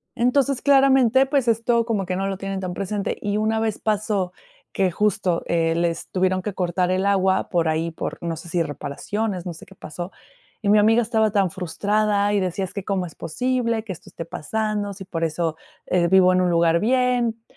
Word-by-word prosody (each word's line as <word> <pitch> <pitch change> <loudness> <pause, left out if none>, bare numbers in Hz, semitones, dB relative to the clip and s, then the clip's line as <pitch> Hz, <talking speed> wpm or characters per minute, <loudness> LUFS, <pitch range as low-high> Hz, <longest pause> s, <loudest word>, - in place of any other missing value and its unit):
Entonces 260 +2 +1
claramente, 270 -2 +5
pues 270 -3 0
esto 230 +1 +2
como 210 -5 -1
que 185 0 -2
no 195 +1 -1
lo 195 -1 -3
tienen 195 0 -4
tan 180 -1 -4
presente. 200 +1 -3
Y 205 0 -1
una 220 +1 +1
vez 220 -1 -1
pasó, 205 -4 -1 0.4
que 190 -2 +1
justo, 195 -2 0
eh, 165 -1 +1
les 170 0 -2
tuvieron 185 0 +1
que 210 - -3
cortar 180 0 0
el 190 +1 0
agua, 190 -1 +2
por 170 -3 +1
ahí 160 +1 0
por, - - -5
no 170 -1 -3
sé 165 +1 -10
si 170 0 0
reparaciones, 180 +7 -3
no - - -3
sé 160 - -13
qué 195 - -16
pasó, 175 +3 -7 0.5
y 200 - 0
mi 210 - +6
amiga 225 +3 +5
estaba 220 -2 +1
tan 195 -4 +2
frustrada 205 +3 0
y 205 - +3
decía: 185 +1 -1
"Es - - -11
que, 200 - -4
¿cómo 190 -3 -1
es - - -14
posible 230 +3 -1
que 200 -4 -5
esto - - -14
esté 165 - -7
pasando? 210 +4 -3
Si 190 -1 -10
por 165 -3 -4
eso 160 0 -1 0.5
vivo 185 -1 +6
en 185 - +3
un 180 - +2
lugar 170 0 +3
bien". 245 -1 +1
195 Hz, 205 wpm, -23 LUFS, 180-220 Hz, 0.5 s, mi